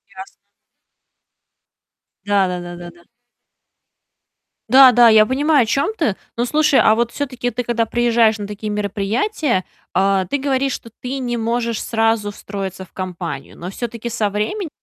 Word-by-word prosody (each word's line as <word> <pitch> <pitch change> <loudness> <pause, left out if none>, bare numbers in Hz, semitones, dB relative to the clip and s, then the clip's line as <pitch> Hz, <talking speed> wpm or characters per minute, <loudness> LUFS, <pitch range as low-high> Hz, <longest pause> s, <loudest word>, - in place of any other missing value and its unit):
Ясно. 190 +1 -8 2.0
Да, 200 -2 +2
да, 180 0 -3
да, 175 0 -8
да, 175 0 -9
да. 170 0 -21 1.7
Да, 260 +1 +8
да, 240 0 +6
я 220 -1 +6
понимаю, 285 +3 +2
о - - -3
чём 275 - 0
ты. 230 - 0 0.2
Ну, 235 - 0
слушай, 300 +1 +3
а - - +5
вот 235 +1 0
всё-таки 255 -3 -3
ты, 245 +2 -3
когда 235 -1 0
приезжаешь 230 -1 +2
на 205 -1 -6
такие 210 +1 -6
мероприятия, 210 - -1 0.3
э, 195 0 +2
ты 285 - 0
говоришь, 270 -1 0
что 230 - -8
ты 260 +2 -4
не 240 -2 -2
можешь 230 0 -1
сразу 225 -2 0
встроиться 195 -2 -6
в 185 - -17
компанию, 175 -6 -6
но 175 - -6
всё-таки 235 +3 -5
со 220 -3 -1
временем 215 - -3
225 Hz, 160 wpm, -19 LUFS, 200-250 Hz, 2.0 s, Да